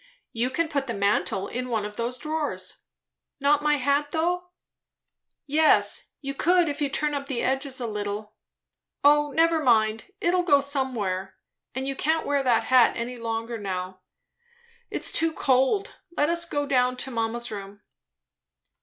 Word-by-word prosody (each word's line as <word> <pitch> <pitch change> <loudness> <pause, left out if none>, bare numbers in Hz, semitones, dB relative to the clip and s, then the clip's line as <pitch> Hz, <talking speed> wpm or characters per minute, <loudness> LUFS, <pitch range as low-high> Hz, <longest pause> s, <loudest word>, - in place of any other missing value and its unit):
"You 235 +2 -1
can 335 +5 0
put 280 -3 -2
the 235 - -3
mantle 200 -1 0
in 250 +1 -4
one 220 -3 -1
of 210 0 -7
those 235 +3 -3
drawers." 305 +2 -4 0.6
"Not 285 +1 +3
my 300 0 +3
hat, 285 +2 +1
though." 350 +3 -1 1.0
"Yes, 305 +2 +3
you 275 -1 -4
could, 350 +4 +3
if 295 0 -3
you 285 - +1
turn 295 +2 -1
up 280 -1 -3
the 255 -4 -2
edges 270 0 -1
a 245 - -3
little. 210 -1 -4 0.7
O 295 0 +5
never 325 +2 +3
mind; 220 -4 +2
it'll 360 +1 +2
go 300 -5 +4
somewhere, 240 -10 -2 0.4
and 265 +1 -3
you 275 - -2
can't 320 +4 0
wear 285 -1 +1
that 245 -4 +2
hat 255 -2 +5
any 245 +2 -4
longer 230 0 -3
now. 185 -2 -5 0.9
It's - - -1
too 325 0 +2
cold. 265 +10 +1 0.2
Let 295 - +3
us 340 0 0
go 290 -3 -2
down 255 -2 +2
to 265 +1 -2
mamma's 235 0 -2
room." 200 0 -8
265 Hz, 160 wpm, -25 LUFS, 230-295 Hz, 1.0 s, O